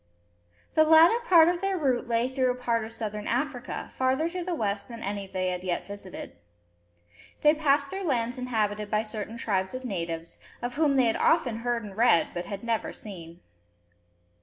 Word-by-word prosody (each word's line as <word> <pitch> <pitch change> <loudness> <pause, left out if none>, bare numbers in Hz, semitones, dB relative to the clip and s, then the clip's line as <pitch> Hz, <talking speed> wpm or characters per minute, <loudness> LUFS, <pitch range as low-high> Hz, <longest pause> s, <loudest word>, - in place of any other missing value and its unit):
The 315 - +6
latter 325 +8 +6
part 330 -5 +7
of 350 0 +1
their 390 -1 0
route 260 -7 0
lay 235 +1 +1
through 260 -1 0
a 250 - 0
part 235 -2 -1
of 220 - -7
Southern 210 -2 -4
Africa, 255 0 -3
farther 260 +5 +1
to 360 +1 -4
the 355 0 -2
west 200 -6 -2
than 235 -2 -8
any 200 0 -4
they 185 -1 -2
had 180 0 -4
yet 180 -2 -2
visited. 200 -2 -8 1.1
They 300 0 +6
passed 285 -2 +1
through 385 0 -4
lands 245 -4 0
inhabited 215 -4 -1
by 215 +1 +1
certain 215 +1 -6
tribes 195 -1 -1
of 255 0 -6
natives, 170 -6 -4 0.2
of 245 0 -4
whom 290 -1 +2
they 260 -2 +4
had 225 - +1
often 260 -9 +2
heard 235 0 -1
and 200 -2 -9
read, 220 -7 +4
but 175 0 -5
had 200 0 -6
never 230 -1 -1
seen. 170 -4 -10
235 Hz, 185 wpm, -27 LUFS, 205-275 Hz, 1.1 s, part